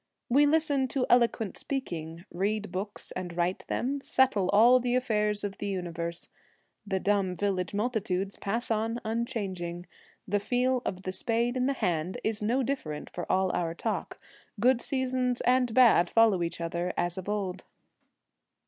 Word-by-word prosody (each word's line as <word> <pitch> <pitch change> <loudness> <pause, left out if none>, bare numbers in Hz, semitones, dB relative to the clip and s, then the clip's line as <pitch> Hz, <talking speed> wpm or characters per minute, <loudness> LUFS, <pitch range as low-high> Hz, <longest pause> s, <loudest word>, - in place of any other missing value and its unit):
We 285 +4 +5
listen 290 -3 +2
to 255 0 -1
eloquent 235 -4 +3
speaking, 170 - -4
read 210 +4 -1
books 200 +3 -5
and 175 -2 -6
write 175 +2 -1
them, 275 +3 -1
settle 255 -10 +2
all 235 +5 +6
the 245 0 0
affairs 210 -5 0
of 200 -1 -4
the 205 - -3
universe. 170 -3 -4 0.6
The 190 -1 0
dumb 195 -2 +1
village 195 -2 -1
multitudes 200 -4 -1
pass 230 +4 -3
on 225 +2 0
unchanging; 195 -7 -3 0.4
the 205 +2 +1
feel 250 +4 +1
of 185 0 -4
the 185 - -3
spade 235 +5 0
in 255 0 +1
the 275 - +1
hand 180 -7 -1
is 220 -1 -1
no 240 +6 +1
different 195 - -4
for 175 - -4
all 190 -1 +2
our 165 -1 -1
talk: - - -3 0.4
good 245 +2 +4
seasons 255 -2 0
and 250 -1 +3
bad 220 -8 +5
follow 225 -5 +4
each 170 0 -2
other 170 +1 -2
as 175 +1 -1
of 190 - -7
old. 190 -3 -2
210 Hz, 155 wpm, -29 LUFS, 180-245 Hz, 0.6 s, all